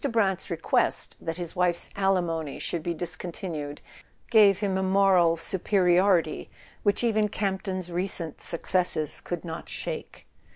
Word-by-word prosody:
Brant's 195 Hz, -5 st, +1 dB
request 165 Hz, -2 st, 0 dB
that 165 Hz, 0 st, -4 dB
his 175 Hz, -2 st, -5 dB
wife's 180 Hz, -1 st, 0 dB
alimony 175 Hz, -6 st, 0 dB
should 170 Hz, -, -3 dB
be 170 Hz, +1 st, -3 dB
discontinued 160 Hz, -3 st, -5 dB, 0.5 s
gave 205 Hz, -4 st, +6 dB
him 200 Hz, -3 st, -1 dB
a 190 Hz, -, 0 dB
moral 190 Hz, -3 st, +4 dB
superiority 180 Hz, -2 st, +2 dB, 0.3 s
which 205 Hz, +2 st, +1 dB
even 215 Hz, -2 st, +2 dB
Campton's 190 Hz, -2 st, -3 dB
recent 175 Hz, -3 st, -1 dB
successes 170 Hz, -3 st, +1 dB
could 175 Hz, 0 st, -5 dB
not 160 Hz, -1 st, -7 dB
shake. -, -, -6 dB
180 Hz, 125 wpm, -26 LUFS, 170-195 Hz, 0.5 s, gave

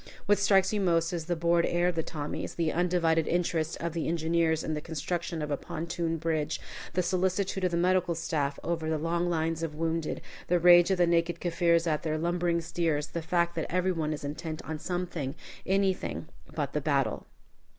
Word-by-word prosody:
What 205 Hz, +1 st, +3 dB
strikes 195 Hz, 0 st, +4 dB
you 210 Hz, -, +1 dB
most 165 Hz, -2 st, +2 dB
is 165 Hz, -2 st, -3 dB
the 175 Hz, +1 st, 0 dB
bored 170 Hz, +1 st, +2 dB
air 175 Hz, +1 st, +2 dB
of -, -, -1 dB
the 165 Hz, -, 0 dB
Tommies, 150 Hz, -2 st, -5 dB
the 165 Hz, -2 st, 0 dB
undivided 170 Hz, -2 st, +2 dB
interest 170 Hz, -2 st, 0 dB
of 170 Hz, -1 st, -3 dB
the 165 Hz, -2 st, -2 dB
engineers 165 Hz, -1 st, +1 dB
in 155 Hz, -, -2 dB
the 150 Hz, -, -3 dB
construction 165 Hz, +1 st, -3 dB
of 150 Hz, -, -4 dB
a 145 Hz, -, +1 dB
pontoon 170 Hz, 0 st, -3 dB
bridge, 160 Hz, -2 st, -1 dB, 0.3 s
the 180 Hz, +2 st, +1 dB
solicitude 185 Hz, +2 st, 0 dB
of 180 Hz, -, +3 dB
the 170 Hz, -, -1 dB
medical 180 Hz, -1 st, +2 dB
staff 145 Hz, -4 st, -1 dB
over 165 Hz, -2 st, -1 dB
the 160 Hz, -, +1 dB
long 170 Hz, +3 st, 0 dB
lines 165 Hz, -1 st, 0 dB
of 160 Hz, -2 st, -3 dB
wounded, 165 Hz, 0 st, -1 dB, 0.3 s
the 175 Hz, -, +3 dB
rage 175 Hz, +1 st, +7 dB
of 190 Hz, -, +2 dB
the 175 Hz, -, +5 dB
naked 170 Hz, 0 st, +1 dB
Kaffirs 170 Hz, -1 st, +2 dB
at 155 Hz, -3 st, 0 dB
their 155 Hz, -1 st, -1 dB
lumbering 170 Hz, +1 st, 0 dB
steers; 160 Hz, -3 st, -1 dB
the 170 Hz, -, -3 dB
fact 170 Hz, +1 st, +1 dB
that 160 Hz, -, -3 dB
every 185 Hz, +1 st, +2 dB
one 160 Hz, -3 st, -1 dB
is 150 Hz, -, -4 dB
intent 155 Hz, +2 st, -4 dB
on 155 Hz, -1 st, -4 dB
something 175 Hz, -6 st, -3 dB, 0.3 s
anything 190 Hz, -4 st, 0 dB, 0.3 s
but 145 Hz, -3 st, -2 dB
the 150 Hz, -, 0 dB
battle. 140 Hz, -2 st, 0 dB
170 Hz, 200 wpm, -29 LUFS, 160-175 Hz, 0.3 s, rage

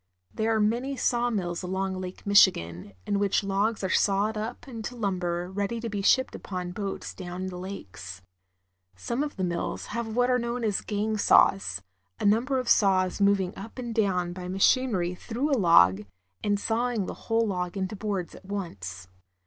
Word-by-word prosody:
There 220 Hz, +1 st, 0 dB
are -, -, +2 dB
many 240 Hz, +6 st, 0 dB
sawmills 220 Hz, -10 st, 0 dB
along 190 Hz, +1 st, -2 dB
Lake 185 Hz, 0 st, -8 dB
Michigan, 100 Hz, -, +4 dB
in 200 Hz, -, 0 dB
which 200 Hz, 0 st, +2 dB
logs 200 Hz, +2 st, 0 dB
are 190 Hz, -, 0 dB
sawed 205 Hz, +2 st, +2 dB
up 220 Hz, +6 st, -5 dB
into 235 Hz, -1 st, -6 dB
lumber 180 Hz, -5 st, -2 dB
ready 205 Hz, +4 st, -2 dB
to 230 Hz, 0 st, -4 dB
be 205 Hz, -2 st, -3 dB
shipped 260 Hz, +6 st, +3 dB
upon 180 Hz, -2 st, -5 dB
boats 195 Hz, +1 st, -5 dB
down 180 Hz, 0 st, -6 dB
the 185 Hz, -1 st, -5 dB
lakes. 100 Hz, -, -8 dB, 0.7 s
Some 235 Hz, -, -3 dB
of 295 Hz, 0 st, -3 dB
the 190 Hz, -, -3 dB
mills 175 Hz, -1 st, -2 dB
have 235 Hz, 0 st, -2 dB
what 245 Hz, +1 st, +3 dB
are 250 Hz, -, +3 dB
know 235 Hz, 0 st, -2 dB
as 220 Hz, -5 st, 0 dB
gang 215 Hz, +1 st, -1 dB
saws, 100 Hz, -, +4 dB, 0.4 s
a -, -, -2 dB
number 235 Hz, +6 st, +3 dB
of 255 Hz, -1 st, -2 dB
saws 190 Hz, -3 st, +3 dB
moving 200 Hz, -2 st, +2 dB
up 220 Hz, +5 st, -9 dB
and 240 Hz, -2 st, -4 dB
down 185 Hz, -5 st, +1 dB
by 180 Hz, 0 st, -7 dB
machinery 195 Hz, -1 st, +2 dB
through 245 Hz, +10 st, -3 dB
a 270 Hz, -, +3 dB
log, 100 Hz, -, +5 dB, 0.4 s
and 205 Hz, -1 st, +1 dB
sawing 230 Hz, -1 st, 0 dB
the -, -, -5 dB, 0.2 s
whole 225 Hz, 0 st, +3 dB
log 180 Hz, -2 st, -2 dB
into 190 Hz, +2 st, -2 dB
boards 195 Hz, -4 st, -3 dB
at -, -, -13 dB
once. 100 Hz, -, -6 dB
200 Hz, 175 wpm, -27 LUFS, 180-225 Hz, 0.7 s, log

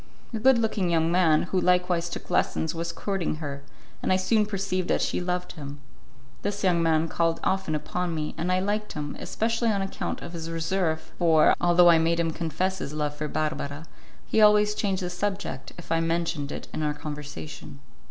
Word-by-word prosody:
A 225 Hz, -, -2 dB
good 260 Hz, +2 st, +5 dB
looking 220 Hz, -5 st, 0 dB
young 165 Hz, -1 st, +2 dB
man, 170 Hz, -4 st, +4 dB
who 180 Hz, +1 st, 0 dB
likewise 180 Hz, -1 st, +2 dB
took -, -, -7 dB
lessons, 160 Hz, -, +1 dB
was 170 Hz, 0 st, -3 dB
courting 190 Hz, -1 st, -2 dB
her, 145 Hz, -3 st, -5 dB, 0.4 s
and -, -, 0 dB
I -, -, +5 dB
soon 210 Hz, +3 st, +2 dB
perceived 195 Hz, -3 st, -1 dB
that -, -, +2 dB
she -, -, 0 dB
loved 180 Hz, 0 st, -2 dB
him. 145 Hz, -3 st, -8 dB, 0.6 s
This 205 Hz, 0 st, -3 dB
young 175 Hz, -3 st, +3 dB
man 160 Hz, 0 st, +2 dB
called 165 Hz, 0 st, 0 dB
often 190 Hz, -5 st, 0 dB
upon 170 Hz, +3 st, -2 dB
me, 150 Hz, -1 st, -3 dB
and 170 Hz, +2 st, -1 dB
I 185 Hz, -, +3 dB
liked 210 Hz, +2 st, -1 dB
him, 145 Hz, -1 st, -4 dB
especially 230 Hz, +1 st, 0 dB
on 200 Hz, -3 st, +1 dB
account 195 Hz, -, -4 dB
of 170 Hz, -, -8 dB
his 165 Hz, -1 st, -5 dB
reserve, 165 Hz, 0 st, -1 dB
for, 160 Hz, -3 st, +5 dB
although 175 Hz, 0 st, +6 dB
I 165 Hz, -, +5 dB
made 165 Hz, +1 st, +2 dB
him 165 Hz, -1 st, +1 dB
confess 175 Hz, +4 st, -2 dB
his 145 Hz, -, -5 dB
love 150 Hz, -1 st, -1 dB
for 150 Hz, +1 st, -3 dB
Barbara, 150 Hz, 0 st, -3 dB, 0.4 s
he 220 Hz, -, +2 dB
always 210 Hz, 0 st, +6 dB
changed 195 Hz, -3 st, -1 dB
the 180 Hz, -, -2 dB
subject, 190 Hz, -7 st, -3 dB
if 175 Hz, -, -10 dB
I 165 Hz, -, +3 dB
mentioned 165 Hz, -3 st, -1 dB
it -, -, -6 dB
in -, -, -3 dB
our 150 Hz, -1 st, 0 dB
conversation. 145 Hz, -, -7 dB
170 Hz, 195 wpm, -26 LUFS, 160-190 Hz, 0.6 s, although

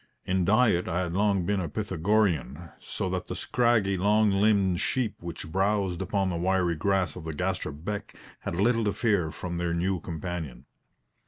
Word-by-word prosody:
In 95 Hz, -1 st, +1 dB
diet 110 Hz, -3 st, +3 dB
I 90 Hz, +1 st, 0 dB
had 85 Hz, -2 st, -3 dB
long 100 Hz, -2 st, +2 dB
been 100 Hz, +1 st, +1 dB
a 85 Hz, -4 st, -3 dB
Pythagorean, 85 Hz, -2 st, 0 dB
so -, -, -4 dB
that -, -, -3 dB
the -, -, -4 dB
scraggy, 110 Hz, -6 st, +2 dB
long 105 Hz, +2 st, +3 dB
limbed 100 Hz, -3 st, +3 dB
sheep 125 Hz, -5 st, 0 dB
which 85 Hz, -2 st, -7 dB
browsed 95 Hz, -1 st, 0 dB
upon 95 Hz, 0 st, 0 dB
the 85 Hz, -, -2 dB
wiry 90 Hz, 0 st, +1 dB
grass 95 Hz, +3 st, +1 dB
by -, -, -8 dB
the 80 Hz, -1 st, -5 dB
Gaster 95 Hz, +1 st, -2 dB
Beck 95 Hz, +8 st, -6 dB, 0.2 s
had -, -, -4 dB
little 115 Hz, +5 st, +2 dB
to 105 Hz, -, +1 dB
fear 100 Hz, -9 st, +1 dB
from 85 Hz, +2 st, -5 dB
their 85 Hz, -1 st, -1 dB
new 90 Hz, +2 st, 0 dB
companion. 80 Hz, -6 st, -6 dB
95 Hz, 175 wpm, -27 LUFS, 85-105 Hz, 0.2 s, diet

